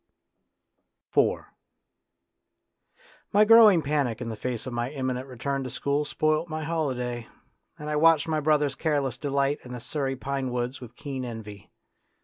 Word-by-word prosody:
IV -, -, +3 dB, 1.9 s
My 210 Hz, +2 st, +5 dB
growing 215 Hz, -6 st, +7 dB
panic 140 Hz, -6 st, 0 dB
in 120 Hz, -2 st, -4 dB
the 110 Hz, -, -4 dB
face 120 Hz, +1 st, -4 dB
of 130 Hz, -, -5 dB
my 120 Hz, +1 st, -1 dB
im 135 Hz, -2 st, -3 dB
minent 130 Hz, +1 st, -4 dB
return 135 Hz, +2 st, -3 dB
to 130 Hz, -, -5 dB
school 140 Hz, +3 st, -1 dB
spoilt 155 Hz, +2 st, 0 dB
my 155 Hz, 0 st, -4 dB
holiday, 125 Hz, -7 st, -2 dB, 0.5 s
and 150 Hz, -, -8 dB
I 150 Hz, 0 st, 0 dB
watched 165 Hz, 0 st, +5 dB
my 155 Hz, -1 st, 0 dB
brother's 150 Hz, -2 st, +2 dB
careless 140 Hz, -5 st, -1 dB
delight 140 Hz, 0 st, 0 dB
in 125 Hz, -, -9 dB
the 125 Hz, -, -5 dB
Surrey 135 Hz, +1 st, -2 dB
pine 135 Hz, 0 st, -3 dB
woods 125 Hz, +2 st, -3 dB
with 120 Hz, -1 st, -11 dB
keen 135 Hz, -2 st, -5 dB
envy. 110 Hz, -4 st, -8 dB
140 Hz, 155 wpm, -26 LUFS, 125-150 Hz, 1.9 s, growing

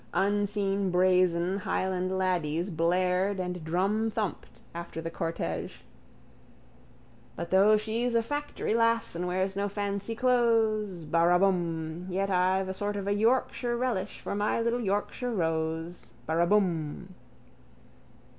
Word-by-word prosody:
Unseen 200 Hz, -1 st, +1 dB
brazen 180 Hz, 0 st, +3 dB
highland 185 Hz, -1 st, -1 dB
laddies 175 Hz, -1 st, 0 dB
blared 180 Hz, +4 st, +1 dB
and 180 Hz, -2 st, -4 dB
drumthumped 210 Hz, +5 st, -1 dB, 0.3 s
after 170 Hz, -1 st, -6 dB
the 165 Hz, 0 st, -4 dB
cortège: 165 Hz, 0 st, -4 dB, 1.5 s
But 170 Hz, +1 st, -6 dB
though 200 Hz, +3 st, +6 dB
she's 230 Hz, +3 st, -1 dB
a 230 Hz, -, +3 dB
factory 290 Hz, -2 st, -3 dB
lass 230 Hz, 0 st, +2 dB
And 175 Hz, +1 st, -3 dB
wears 185 Hz, +2 st, -1 dB
no 200 Hz, +1 st, -1 dB
fancy 200 Hz, +2 st, -3 dB
clothes. 225 Hz, -7 st, +2 dB
Baraabum. 170 Hz, 0 st, +1 dB
Yet 195 Hz, +2 st, -1 dB
I've 185 Hz, +1 st, +2 dB
a 190 Hz, -, -3 dB
sort 205 Hz, +2 st, -3 dB
of 200 Hz, -1 st, -3 dB
a 200 Hz, -, +1 dB
Yorkshire 240 Hz, +2 st, +1 dB
relish 230 Hz, -6 st, -2 dB
for -, -, -4 dB
My 205 Hz, +3 st, 0 dB
little 235 Hz, +1 st, 0 dB
Yorkshire 215 Hz, +4 st, -2 dB
rose. 165 Hz, 0 st, -2 dB, 0.2 s
Baraabum. 170 Hz, 0 st, +1 dB
190 Hz, 120 wpm, -28 LUFS, 175-210 Hz, 1.5 s, though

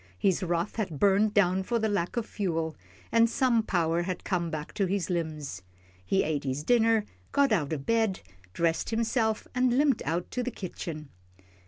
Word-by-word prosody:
His 190 Hz, -, +2 dB
wrath 175 Hz, +2 st, -1 dB
had 185 Hz, -10 st, -3 dB
burned 205 Hz, +2 st, +3 dB
down 190 Hz, -2 st, +3 dB
for 235 Hz, +5 st, -1 dB
lack 205 Hz, -4 st, -1 dB
of 235 Hz, -, 0 dB
fuel, 165 Hz, -7 st, -2 dB, 0.4 s
and 230 Hz, 0 st, +5 dB
some 245 Hz, -2 st, +2 dB
power 170 Hz, -5 st, +1 dB
had 180 Hz, 0 st, -4 dB
come 175 Hz, -3 st, -1 dB
back 155 Hz, 0 st, -5 dB
to 195 Hz, -, 0 dB
his 190 Hz, 0 st, -1 dB
limbs. 155 Hz, -, -3 dB, 0.4 s
He 195 Hz, -, +2 dB
ate 150 Hz, -2 st, -1 dB
his 135 Hz, +1 st, -2 dB
dinner, 225 Hz, +1 st, +3 dB, 0.3 s
got 280 Hz, -3 st, +3 dB
out 165 Hz, -9 st, +1 dB
of 140 Hz, -3 st, -3 dB
bed, 225 Hz, -4 st, +1 dB, 0.3 s
dressed 165 Hz, -, 0 dB
himself, 225 Hz, -1 st, 0 dB
and 250 Hz, -1 st, +2 dB
limped 280 Hz, -4 st, +3 dB
out 170 Hz, +2 st, -2 dB
to 250 Hz, -, -1 dB
the 250 Hz, -, -2 dB
kitchen. 165 Hz, -, -6 dB
190 Hz, 175 wpm, -28 LUFS, 165-225 Hz, 0.4 s, and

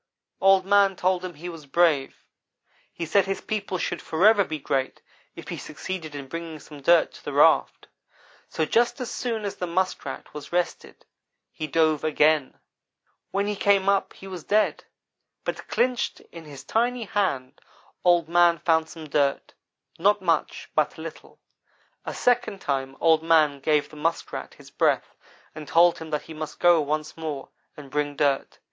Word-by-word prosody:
"Old 195 Hz, -1 st, +5 dB
man 200 Hz, -1 st, +4 dB
told 185 Hz, 0 st, 0 dB
him 180 Hz, -3 st, -6 dB
he 165 Hz, +4 st, -8 dB
was 165 Hz, -4 st, -9 dB
brave. 150 Hz, -2 st, +2 dB, 0.8 s
He 170 Hz, -, -5 dB
said 195 Hz, +4 st, +3 dB
his 195 Hz, -, -2 dB
people 205 Hz, -3 st, -3 dB
should -, -, -3 dB
forever 200 Hz, +6 st, +4 dB
be 160 Hz, -4 st, -4 dB
great 135 Hz, -2 st, -2 dB, 0.4 s
if -, -, -10 dB
he -, -, -4 dB
succeeded 155 Hz, 0 st, -6 dB
in 140 Hz, -1 st, -7 dB
bringing 165 Hz, +1 st, -6 dB
some 145 Hz, -1 st, -13 dB
dirt 170 Hz, +3 st, +4 dB
to -, -, -14 dB
the -, -, -5 dB
raft; -, -, +3 dB, 0.6 s
so 160 Hz, -, -1 dB
just 240 Hz, -, +1 dB
as 250 Hz, -, -4 dB
soon 225 Hz, -4 st, -3 dB
as 200 Hz, -, -4 dB
the 180 Hz, -, -3 dB
Muskrat 185 Hz, +2 st, -3 dB
was 150 Hz, -1 st, -9 dB
rested 175 Hz, 0 st, -3 dB, 0.5 s
he 155 Hz, -, -5 dB
dove 155 Hz, 0 st, +2 dB
again. 155 Hz, -, +2 dB, 0.7 s
"When 200 Hz, +1 st, -1 dB
he 205 Hz, 0 st, -2 dB
came 195 Hz, -1 st, +2 dB
up 200 Hz, 0 st, +1 dB
he -, -, -13 dB
was 185 Hz, -4 st, -7 dB
dead, 210 Hz, +5 st, +1 dB, 0.6 s
but -, -, -5 dB
clinched 250 Hz, -1 st, 0 dB
in 165 Hz, -1 st, -10 dB
his 140 Hz, -3 st, -10 dB
tiny 240 Hz, +1 st, 0 dB
hand 185 Hz, -12 st, -2 dB, 0.4 s
Old 175 Hz, -3 st, +4 dB
man 170 Hz, 0 st, +4 dB
found 160 Hz, 0 st, +1 dB
some 160 Hz, -2 st, -9 dB
dirt 140 Hz, -1 st, 0 dB, 0.5 s
not 205 Hz, +4 st, +3 dB
much, 165 Hz, -4 st, -1 dB
but 155 Hz, -1 st, +1 dB
a -, -, -8 dB
little. 165 Hz, -1 st, -10 dB, 0.7 s
A -, -, -5 dB
second 225 Hz, -5 st, +1 dB
time 135 Hz, -3 st, -3 dB
Old 160 Hz, -1 st, +4 dB
man 155 Hz, -3 st, +3 dB
gave 150 Hz, +1 st, +1 dB
the -, -, -14 dB
Muskrat 165 Hz, +3 st, -3 dB
his -, -, -16 dB
breath, -, -, +1 dB, 0.4 s
and 155 Hz, -1 st, -9 dB
told 170 Hz, +3 st, +4 dB
him 160 Hz, -1 st, -8 dB
that 150 Hz, -1 st, -2 dB
he 160 Hz, -, -10 dB
must 155 Hz, 0 st, -7 dB
go 175 Hz, -2 st, +5 dB
once 155 Hz, +1 st, -3 dB
more, 155 Hz, -4 st, -5 dB, 0.3 s
and 140 Hz, -3 st, -11 dB
bring 145 Hz, 0 st, -1 dB
dirt. 140 Hz, -2 st, 0 dB
165 Hz, 170 wpm, -25 LUFS, 150-190 Hz, 0.8 s, Old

